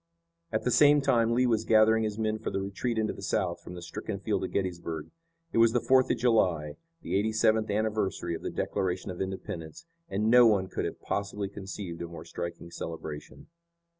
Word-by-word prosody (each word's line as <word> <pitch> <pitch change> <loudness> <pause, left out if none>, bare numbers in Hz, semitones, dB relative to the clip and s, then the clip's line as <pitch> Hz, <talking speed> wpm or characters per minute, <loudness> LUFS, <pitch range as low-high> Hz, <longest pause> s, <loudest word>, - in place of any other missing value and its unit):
At 110 - -1
the 125 - +1
same 145 +4 +6
time 120 -5 +2
Lee 125 +1 +3
was 115 -3 +2
gathering 110 0 +5
his 105 -1 -3
men 110 -1 -1
for - - -3
the - - -2
retreat 100 +5 -3
into 110 -1 0
the - - -10
South 95 -5 -1
from 90 - -9
the 90 - -8
stricken 85 - -5
field - - -1
of - - -2
Gettysburg. 85 -5 -3 0.4
It - - +2
was 115 0 +5
the 120 - +3
Fourth 130 +1 +4
of - - +1
July, 90 -11 +2 0.3
the - - -2
eighty 105 +3 +2
seventh 110 0 +2
anniversary 105 -4 -1
of 80 - -5
the - - -3
Declaration 95 +1 -2
of 90 - -6
Independence, 95 -4 -6 0.2
and 105 +3 +1
no 125 -1 +8
one 95 -4 +2
could - - -2
have - - -6
possibly 100 0 -2
conceived 95 -3 -7
a 85 - -4
more 85 -1 -9
striking 85 0 -6
celebration. 80 -3 -7
100 Hz, 200 wpm, -29 LUFS, 90-110 Hz, 0.4 s, no